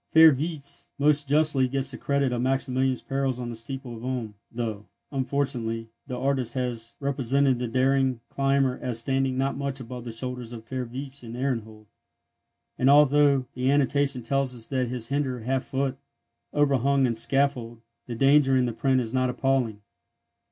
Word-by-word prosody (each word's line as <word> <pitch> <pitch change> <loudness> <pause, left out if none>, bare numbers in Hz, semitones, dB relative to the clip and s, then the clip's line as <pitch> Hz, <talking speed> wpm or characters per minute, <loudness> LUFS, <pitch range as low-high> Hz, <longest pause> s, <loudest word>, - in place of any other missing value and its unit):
Fürwitz 155 -2 +4
most 145 0 +2
justly 150 -3 +3
gets 135 +1 -1
the - - -7
credit 140 -2 0
of 120 - -1
Maximilian's 130 0 0
perils 135 -2 -1
on 120 -1 -4
the 120 - -5
steeple 125 +1 -6
of 115 - -11
Ulm, 125 -4 -3 0.2
though, 110 -3 -4 0.2
unfortunately, 130 -4 -2 0.2
the 125 -2 -4
artist 130 -1 0
has 120 -3 -3
represented 135 -1 +1
the 125 - -2
daring 130 +1 +2
climber 135 -1 +1
as 125 -3 -2
standing 135 +1 0
not 135 +1 0
much 140 -1 -3
above 125 0 -7
the 120 - -6
shoulders 125 0 -6
of 115 -1 -9
Fürwitz 130 +3 -5
and 115 -1 -8
Ehrenhold; 110 -5 -3 0.9
and 130 - +4
although 145 -1 +5
the 130 +1 0
annotation 140 -2 +2
tells 135 +1 0
us 115 -2 -8
that 130 -2 0
his 120 -1 -4
"hinder 135 -3 -1
half 130 +3 -1
foot" 135 -1 -2 0.5
overhung 140 -1 +2
the 125 -2 +2
scaffold, 120 -1 +1 0.3
the 120 - -4
danger 135 +1 +4
in 125 - +3
the 120 - -2
print 130 +2 +2
is 115 -1 -5
not 130 -1 +2
appalling. 125 -4 0
130 Hz, 165 wpm, -26 LUFS, 120-140 Hz, 0.9 s, although